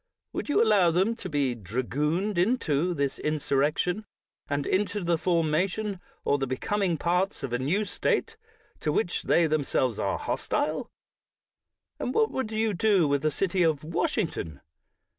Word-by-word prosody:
Would - - -4
you 290 - +4
allow 205 -6 +5
them 190 +7 +2
to 185 - -6
be 140 -5 +1
dragooned 145 - -1
into 175 - +1
this 140 -2 -1
insurrection, 155 +6 0 0.4
and 140 0 -1
into 205 +1 0
the 170 0 +2
formation 180 +5 0 0.3
or 145 - +2
the 135 - -1
becoming 185 - 0
parts 180 +3 0
of 130 -3 -3
a 120 - +1
new 180 +11 0
State, 445 - -1 0.4
to 150 - 0
which 180 +2 0
they 170 - +3
themselves 140 -6 0
are - - 0
hostile? - - -2 1.1
And 250 - -3
what 445 -1 +3
would 260 -5 -3
you 220 -1 0
do 195 -3 +3
with 140 -1 +1
the 155 - +2
City 185 +4 0
of 160 -4 +2
Wash 165 +3 -1
ington? 80 - -3
170 Hz, 155 wpm, -27 LUFS, 145-200 Hz, 1.1 s, allow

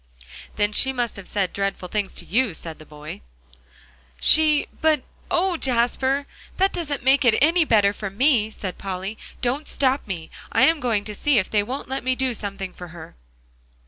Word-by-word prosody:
"Then 205 0 +1
she 265 +5 +4
must 245 -3 -2
have 200 -2 -8
said 195 -3 -1
dreadful 195 -2 -2
things 205 +1 -3
to - - -1
you," 230 -4 +1
said 160 -1 -7
the 155 - -14
boy. 150 - -9 1.0
"She 305 - +5 0.2
but, 310 -4 +3 0.3
oh, 360 0 +1
Jasper! 260 +2 +1 0.3
that 385 +1 +2
doesn't 290 -7 -3
make 270 +2 +4
it 235 -3 +4
any 325 +3 +4
better 205 -6 +4
for 205 -1 -5
me," 220 +1 +2
said 190 -4 -6
Polly. 195 +2 -5 0.2
"Don't 265 +5 -1
stop 270 -1 +1
me; 170 -5 -6 0.2
I - - +3
am 325 -1 +4
going 225 -6 0
to 210 - -5
see 280 +5 +2
if 190 - +1
they 210 - +3
won't 255 +7 -5
let 265 -1 -4
me 255 0 +1
do 260 -1 0
something 200 -3 -5
for 180 - -9
her." 165 -1 -12
235 Hz, 185 wpm, -23 LUFS, 195-275 Hz, 1.0 s, She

